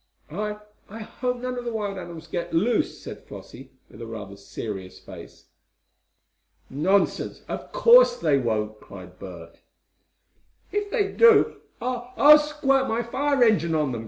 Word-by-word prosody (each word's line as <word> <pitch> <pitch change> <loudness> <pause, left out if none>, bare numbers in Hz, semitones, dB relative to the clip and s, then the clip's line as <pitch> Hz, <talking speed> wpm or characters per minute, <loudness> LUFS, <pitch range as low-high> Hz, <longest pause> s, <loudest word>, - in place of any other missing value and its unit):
"I 210 +4 -4 0.3
I 220 +3 -9
hope 250 +3 -4
none 250 0 -4
of - - -7
the 235 - -3
wild 205 -3 -4
animals 170 -2 -9
get 170 -1 -4
loose," 220 +7 +1
said - - -10
Flossie, 130 +2 -11 0.2
with - - -14
rather 110 -4 -8
a - - -13
serious 100 -2 -7
face. - - -13 1.3
"Nonsense! 185 +9 0
Of - - -6
course - - +6
they 140 - +2
won't!" 110 -3 -2
cried 90 -3 -13
Bert. 85 -3 -11 1.1
"If 415 0 -2
they 400 0 0
do, 465 -2 +5 0.2
I 245 0 -4
I'll 300 +1 +8
squirt 280 -3 0
my 230 +2 -1
fire 275 +3 +1
engine 170 -8 +2
on 150 -4 0
them!" 120 - -4
210 Hz, 150 wpm, -24 LUFS, -, 1.3 s, I'll